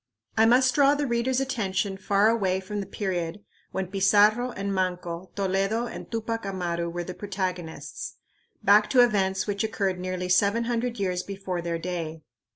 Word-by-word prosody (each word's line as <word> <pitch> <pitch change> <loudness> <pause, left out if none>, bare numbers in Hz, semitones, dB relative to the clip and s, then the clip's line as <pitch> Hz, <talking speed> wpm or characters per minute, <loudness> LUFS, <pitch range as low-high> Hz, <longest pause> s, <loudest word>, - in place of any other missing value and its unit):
I 225 0 +5
must 255 +2 +5
draw 285 +1 +5
the 290 0 -1
reader's 245 +1 +1
attention 200 -7 -1
far 200 +2 +2
away 195 -5 +2
from 205 +2 -5
the 195 - -4
period 185 -1 -3 0.3
when 190 0 -2
Pizarro 210 +5 +4
and 200 -4 -3
Manco, 180 -1 -2
Toledo 195 +4 0
and - - -8
Tupac 225 0 -2
Amaru 175 -3 -2
were 175 +1 -4
the 185 - -6
protagonists, 185 -4 -5 0.5
back 210 +1 +5
to 250 -2 +6
events 195 -4 +1
which 200 -1 -1
occurred 195 -4 -1
nearly 185 0 -3
seven 200 +5 +3
hundred 235 0 -2
years 180 -2 0
before 190 -2 -4
their 170 0 -2
day. 165 -2 -4
195 Hz, 160 wpm, -26 LUFS, 185-225 Hz, 0.5 s, to